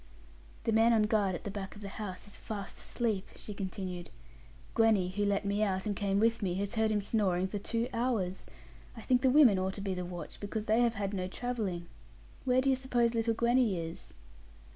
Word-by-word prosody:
'The -, -, +1 dB
man 225 Hz, +2 st, +5 dB
on 220 Hz, -2 st, +4 dB
guard 210 Hz, -3 st, +2 dB
at -, -, -7 dB
the 200 Hz, -, -4 dB
back 195 Hz, 0 st, -6 dB
of 205 Hz, -, -11 dB
the 200 Hz, -, -5 dB
house 195 Hz, -2 st, -6 dB
is 205 Hz, -, -8 dB
fast 205 Hz, -3 st, -6 dB
asleep,' 220 Hz, -5 st, -2 dB
she 210 Hz, -, -8 dB
continued; 185 Hz, -2 st, -5 dB, 0.6 s
'Gwenny, 220 Hz, -5 st, +4 dB
who 205 Hz, +3 st, -1 dB
let 200 Hz, 0 st, +1 dB
me 200 Hz, +1 st, 0 dB
out, 190 Hz, -3 st, 0 dB
and 205 Hz, -1 st, -1 dB
came 200 Hz, -1 st, +1 dB
with 230 Hz, +1 st, +2 dB
me, 180 Hz, -3 st, 0 dB
has 200 Hz, +3 st, -2 dB
heard 220 Hz, -1 st, +2 dB
him 210 Hz, -1 st, +1 dB
snoring 190 Hz, -3 st, +1 dB
for 205 Hz, +2 st, -4 dB
two 230 Hz, +3 st, -1 dB
hours. 230 Hz, -6 st, -1 dB, 0.5 s
I -, -, -7 dB
think 250 Hz, -1 st, +3 dB
the 260 Hz, -, +4 dB
women 255 Hz, -8 st, +6 dB
ought 190 Hz, +1 st, -1 dB
to -, -, -6 dB
be 195 Hz, -1 st, -1 dB
the 180 Hz, 0 st, -3 dB
watch, 175 Hz, -1 st, -7 dB
because 210 Hz, +1 st, -4 dB
they 220 Hz, +2 st, +3 dB
have 235 Hz, -1 st, +2 dB
had 200 Hz, -1 st, -2 dB
no 185 Hz, -2 st, -2 dB
travelling. 205 Hz, -5 st, -3 dB, 0.6 s
Where 255 Hz, 0 st, +4 dB
do 270 Hz, +1 st, +3 dB
you -, -, +4 dB
suppose 245 Hz, -3 st, +1 dB
little 230 Hz, 0 st, +1 dB
Gwenny 235 Hz, -3 st, +3 dB
is?' 165 Hz, 0 st, -7 dB
205 Hz, 215 wpm, -32 LUFS, 190-230 Hz, 0.6 s, women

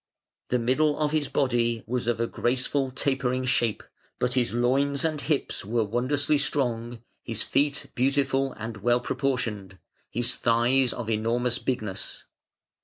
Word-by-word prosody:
The 125 Hz, -, +1 dB
middle 130 Hz, +6 st, +2 dB
of 150 Hz, -1 st, +1 dB
his 155 Hz, -2 st, +1 dB
body 120 Hz, -4 st, +1 dB
was 120 Hz, 0 st, -2 dB
of 120 Hz, -1 st, +1 dB
a 115 Hz, -, +2 dB
graceful 130 Hz, +3 st, 0 dB
tapering 130 Hz, -1 st, 0 dB
shape, 120 Hz, -3 st, +1 dB, 0.3 s
but 125 Hz, 0 st, 0 dB
his 125 Hz, -5 st, +1 dB
loins 135 Hz, +5 st, +1 dB
and 155 Hz, -2 st, -1 dB
hips 150 Hz, -1 st, -1 dB
were 115 Hz, +3 st, +1 dB
wondrously 130 Hz, +7 st, +1 dB
strong; 120 Hz, -5 st, -1 dB, 0.2 s
his 115 Hz, -2 st, -2 dB
feet 145 Hz, +1 st, 0 dB
beautiful 135 Hz, +1 st, +1 dB
and 110 Hz, 0 st, -6 dB
well 120 Hz, +4 st, +2 dB
proportioned; 115 Hz, -8 st, -2 dB, 0.3 s
his 120 Hz, +2 st, 0 dB
thighs 120 Hz, +2 st, +2 dB
of 120 Hz, -2 st, -5 dB
enormous 115 Hz, +2 st, 0 dB
bigness. 110 Hz, -7 st, -3 dB
125 Hz, 140 wpm, -27 LUFS, 115-135 Hz, 0.3 s, middle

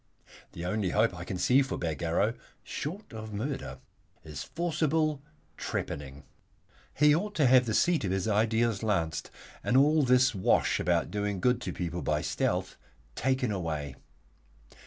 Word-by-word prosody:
The 85 Hz, -, -6 dB
only 100 Hz, +1 st, 0 dB
hope 110 Hz, +2 st, +2 dB
I 90 Hz, 0 st, -7 dB
can 95 Hz, -, -4 dB
see 125 Hz, +9 st, +4 dB
for 135 Hz, -, -2 dB
Bagarrow, 85 Hz, +6 st, 0 dB, 0.3 s
short 170 Hz, -, -6 dB
of 110 Hz, -1 st, -7 dB
murder, 135 Hz, +7 st, -4 dB, 0.5 s
is 75 Hz, -3 st, -7 dB
forcible 155 Hz, -3 st, 0 dB, 0.4 s
trepanning. 70 Hz, 0 st, -5 dB, 0.7 s
He 150 Hz, +1 st, +5 dB
ought 205 Hz, +6 st, -1 dB
to 150 Hz, -, +3 dB
have 125 Hz, -1 st, +5 dB
the 110 Hz, -, 0 dB
seat 175 Hz, -6 st, +3 dB
of -, -, -1 dB
his 95 Hz, +2 st, -1 dB
ideals 110 Hz, 0 st, +1 dB
lanced, 85 Hz, -8 st, -1 dB, 0.3 s
and 125 Hz, -, +2 dB
all 150 Hz, +3 st, +5 dB
this 125 Hz, -1 st, +4 dB
wash 95 Hz, -3 st, +2 dB
about 85 Hz, 0 st, +1 dB
doing 105 Hz, -1 st, -2 dB
good 125 Hz, +3 st, +2 dB
to -, -, -3 dB
people 85 Hz, 0 st, -4 dB
by 75 Hz, 0 st, 0 dB
stealth -, -, -1 dB, 0.4 s
taken 130 Hz, -, 0 dB
away. 80 Hz, -7 st, -3 dB
110 Hz, 150 wpm, -29 LUFS, 90-135 Hz, 0.7 s, He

